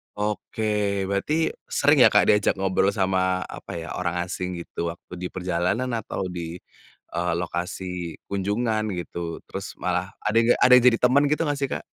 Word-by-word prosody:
Oke, 105 +1 -3 0.5
berarti 100 +10 -1 0.3
sering - - +3
ya, - - +9
Kak, - - +6
diajak 105 -1 +4
ngobrol 95 +1 +1
sama, 95 -1 +1
apa - - -9
ya, 80 - -7
orang 85 -1 -1
asing 90 0 -4
gitu 85 0 -4
waktu 85 - -16
di 90 - -3
perjalanan 90 +7 -1
atau 105 - -5
di, 85 -1 -5 0.6
eee, 85 0 0
lokasi 90 -1 -4
kunjungan 110 +3 0
gitu. 85 -1 -5
Terus 100 +1 -6
malah 90 +1 -1
ada 110 +1 +1
enggak 115 +1 +4
ada 125 - +6
yang 125 - +3
jadi 115 -2 +5
teman 135 +4 +5
gitu 150 - +1
enggak 145 -2 -1
sih, 135 - 0
Kak? - - -4
95 Hz, 170 wpm, -24 LUFS, 90-110 Hz, 0.6 s, ya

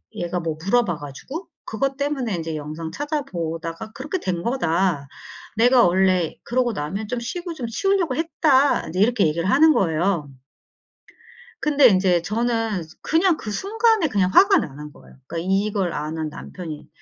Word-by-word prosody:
얘가 175 +1 -2
뭐 165 -2 -3
물어봐 200 -6 +2
가지고 150 - -8 0.2
그것 270 +5 -2
때문에 280 -6 -1
인제 165 -1 -4
영상 155 +2 -6
찾아보다가 175 - -4
그렇게 300 +7 -4
된 180 - -2
거다. 175 - 0 0.5
내가 245 +2 +5
원래 185 -2 +2
그러고 245 -1 0
나면 195 +5 -4
좀 245 +2 -2
쉬고 345 +9 -5
좀 250 -7 -5
치우려고 355 - 0
했다." 295 -4 +2
인제 180 +4 -4
이렇게 215 -4 +3
얘기를 170 +4 -1
하는 310 +8 +6
거예요. 170 - 0 1.3
근데 290 -3 +5
인제 185 -4 +3
저는 225 0 -1 0.2
그냥 335 +1 +2
그 215 - -6
순간에 430 - +1
그냥 195 -6 +1
화가 390 - +6
나는 150 - -6
거예요. - - -18
그니까 165 +4 -5
'이걸 195 -2 0
아는 155 +1 -3
남편이 155 0 -8
205 Hz, 325 characters per minute, -22 LUFS, 170-275 Hz, 1.3 s, 하는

